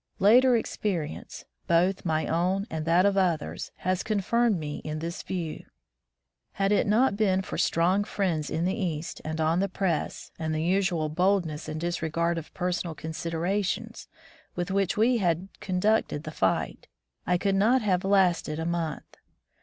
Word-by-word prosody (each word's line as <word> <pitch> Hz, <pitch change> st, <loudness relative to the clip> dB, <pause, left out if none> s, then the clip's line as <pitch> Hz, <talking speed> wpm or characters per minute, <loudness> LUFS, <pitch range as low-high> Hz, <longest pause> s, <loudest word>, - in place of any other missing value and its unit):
Later 240 Hz, +5 st, +6 dB
experience, 185 Hz, -8 st, -3 dB, 0.2 s
both 180 Hz, +3 st, +2 dB
my 160 Hz, -1 st, +1 dB
own 185 Hz, +4 st, 0 dB
and 160 Hz, -1 st, -3 dB
that 175 Hz, +3 st, +4 dB
of 200 Hz, -1 st, +2 dB
others, 175 Hz, -5 st, 0 dB
has 185 Hz, 0 st, -1 dB
confirmed 220 Hz, +1 st, +1 dB
me 150 Hz, -2 st, -4 dB
in 155 Hz, 0 st, -5 dB
this 165 Hz, +2 st, -4 dB
view. 170 Hz, -4 st, -4 dB, 0.9 s
Had 195 Hz, 0 st, 0 dB
it 210 Hz, -, +3 dB
not 215 Hz, +1 st, +3 dB
been 190 Hz, -3 st, +2 dB
for -, -, -5 dB
strong 180 Hz, +5 st, +2 dB
friends 180 Hz, -7 st, -1 dB
in 165 Hz, -, -1 dB
the 185 Hz, -, +1 dB
East 165 Hz, -4 st, -3 dB
and 155 Hz, +1 st, -4 dB
on 160 Hz, +2 st, +2 dB
the 195 Hz, +1 st, 0 dB
press, 180 Hz, -5 st, -2 dB
and 160 Hz, -1 st, -2 dB
the 155 Hz, -, -1 dB
unusual 180 Hz, -3 st, +1 dB
boldness 170 Hz, -2 st, 0 dB
and 155 Hz, 0 st, -4 dB
disregard 170 Hz, 0 st, -1 dB
of 160 Hz, -, -12 dB
personal 180 Hz, -2 st, -2 dB
considerations 180 Hz, +8 st, -3 dB, 0.5 s
with 175 Hz, +1 st, -2 dB
which 195 Hz, 0 st, +1 dB
we 235 Hz, +3 st, +3 dB
had 180 Hz, 0 st, 0 dB
conducted 185 Hz, -4 st, 0 dB
the 155 Hz, -, -6 dB
fight, 95 Hz, -10 st, -1 dB, 0.4 s
I 180 Hz, -, +3 dB
could 195 Hz, +2 st, 0 dB
not 225 Hz, +6 st, +3 dB
have 185 Hz, -3 st, +1 dB
lasted 185 Hz, -5 st, +2 dB
a 160 Hz, -, -3 dB
month. 170 Hz, -2 st, -3 dB
180 Hz, 160 wpm, -27 LUFS, 160-195 Hz, 0.9 s, Later